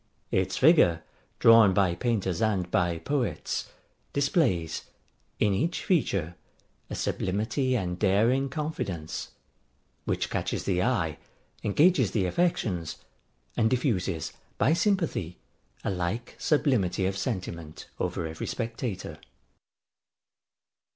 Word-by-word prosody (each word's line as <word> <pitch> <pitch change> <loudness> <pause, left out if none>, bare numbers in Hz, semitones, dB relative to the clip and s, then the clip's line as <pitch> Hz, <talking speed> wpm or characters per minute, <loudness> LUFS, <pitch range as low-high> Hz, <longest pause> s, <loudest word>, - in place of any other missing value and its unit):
Its 95 0 0
figure, 130 - +5 0.3
drawn 115 -4 +7
by 95 -3 +3
painters 95 -4 -1
and 100 -5 0
by 85 -2 +1
poets, 140 - -2 0.4
displays, 135 - +1 0.5
in 105 -2 +3
each 160 - -1
feature, 95 - +1 0.5
a - - -4
sublimity 115 +7 0
and 90 -4 -3
daring 115 +7 +3
confidence; 125 - -4 0.8
which - - -1
catches - - -2
the 90 -2 +1
eye, 90 -11 0 0.4
engages 140 - +4
the 100 -5 +1
affections, 90 - 0 0.6
and 110 -1 +3
diffuses, 100 - -1 0.2
by 140 - +3
sympathy, 170 - 0 0.5
a - - 0
like 95 +6 -3
sublimity 125 - +2
of 95 +1 0
sentiment 90 -7 -4
over 85 - -2
every 80 0 -5
spectator. 115 -3 -4
100 Hz, 105 wpm, -28 LUFS, 90-130 Hz, 0.8 s, drawn